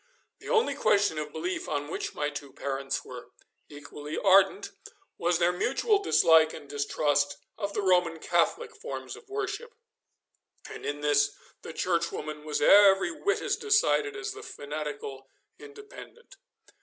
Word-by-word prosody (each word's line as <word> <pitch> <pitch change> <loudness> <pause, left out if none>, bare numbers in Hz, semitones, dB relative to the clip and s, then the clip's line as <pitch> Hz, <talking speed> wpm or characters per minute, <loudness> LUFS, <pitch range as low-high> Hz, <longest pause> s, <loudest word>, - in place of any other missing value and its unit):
The - - -10
only 470 -1 +2
question 200 -6 +2
of 150 -1 -5
belief 175 +4 -4
on 145 0 -2
which 160 - -5
my 150 0 -1
two 145 -2 -8
parents 135 -1 -4
were - - -10 0.4
equally 145 +1 -8
ardent 195 - +4 0.5
was 175 0 +2
their 175 +1 +3
mutual 270 - +1
dislike 160 - +5
and 145 -2 -11
distrust 145 0 0 0.2
of 200 -2 -4
the 205 - -2
Roman 180 -3 +2
Catholic 460 - 0
forms - - -7
of 410 - -17
worship, 420 +3 -4 0.9
and - - -8
in 145 0 -4
this 145 0 +2 0.3
the - - -8
Churchwoman 165 -3 -2
was 150 -1 -1
every 195 -1 +6
whit 400 - -1
as - - 0
decided 420 0 +2
as 405 +1 -4
the 415 +1 -9
fanatical 145 - -7 0.3
Independent. 440 +3 -13
170 Hz, 145 wpm, -28 LUFS, -, 0.9 s, every